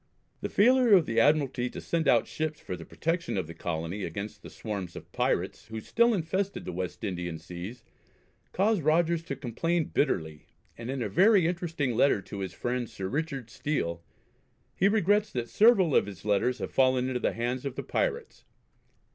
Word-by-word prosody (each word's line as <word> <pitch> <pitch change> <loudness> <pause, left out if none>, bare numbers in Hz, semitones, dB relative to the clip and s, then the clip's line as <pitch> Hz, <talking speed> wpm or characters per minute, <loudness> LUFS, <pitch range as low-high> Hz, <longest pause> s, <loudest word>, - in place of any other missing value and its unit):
The - - -4
failure 250 +1 +5
of 175 -5 +4
the 115 0 +1
Admiralty 135 -2 +2
to - - -7
send 165 -2 -1
out 120 -3 +5
ships 155 -1 -3
for 90 - -5
the 85 -2 -10
protection 165 - -2
of 95 - -1
the 85 - -9
colony 85 +4 -4
against 100 +5 -5
the - - -10
swarms 100 -6 -5
of - - -10
pirates 105 - -1
who 110 0 -5
still 235 - +2
infested 190 +3 -2
the - - -4
West 90 0 -5
Indian 85 -3 -3
seas 90 +9 -8 0.7
caused 205 0 +2
Rogers 165 +2 +2
to 140 - -4
complain 165 +7 -1
bitterly, 80 - -1 0.3
and 115 +1 -7
in 135 -2 -2
a - - -1
very 195 -1 +5
interesting 165 -6 -1
letter 130 -2 +4
to 100 +1 -8
his 95 -1 -3
friend 120 -1 -2
Sir 100 -4 -5
Richard 135 -2 -3
Steele, 85 - -2 0.7
he 190 - +3
regrets 205 0 +2
that 120 -2 -3
several 205 - +5
of - - +4
his 100 -1 -10
letters 105 +5 +2
have - - -5
fallen 130 -1 +3
into 130 -1 -1
the - - 0
hands 120 +2 -2
of 135 -2 -4
the - - -4
pirates. 475 -3 -2
130 Hz, 185 wpm, -28 LUFS, 105-170 Hz, 0.7 s, failure